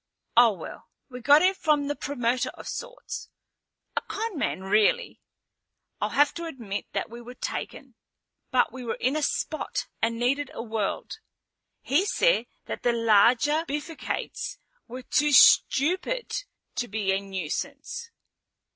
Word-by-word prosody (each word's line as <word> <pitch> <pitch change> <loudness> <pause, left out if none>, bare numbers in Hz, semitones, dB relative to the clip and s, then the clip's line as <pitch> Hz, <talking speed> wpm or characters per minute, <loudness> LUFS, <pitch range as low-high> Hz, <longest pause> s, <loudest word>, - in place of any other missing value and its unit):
Oh, 235 -2 +7
well, 175 - -9 0.2
we 250 -1 -8
got 290 +6 +6
it 380 +1 +4
from 300 -5 +1
a - - +1
promoter 250 -4 -1
of - - -10
sorts. - - -6 0.7
A - - +1
con 440 -1 -4
man, 280 - -1
really. 210 - +2 0.8
I'll - - +1
have 290 0 +3
to 340 - -5
admit 225 -10 -5
that - - -2
we 235 +1 -8
were 245 +1 -10
taken, - - -5 0.6
but - - +2
we 260 -1 -7
were 230 - -2
in 260 +4 0
a 310 - 0
spot 310 +1 -2 0.2
and 230 +1 +1
needed 265 +4 0
a - - -4
world. 220 -3 -3 0.6
He 345 +9 +2
said - - +2 0.2
that - - -5
the 240 - +2
larger 235 +7 +4
bifurcates 300 - -4 0.3
were 250 +2 -8
too 295 +3 +2
stupid 365 - +5 0.4
to 245 - -1
be 205 -2 -1
a 190 - +2
nuisance. 195 - -5
260 Hz, 145 wpm, -26 LUFS, 230-310 Hz, 0.8 s, Oh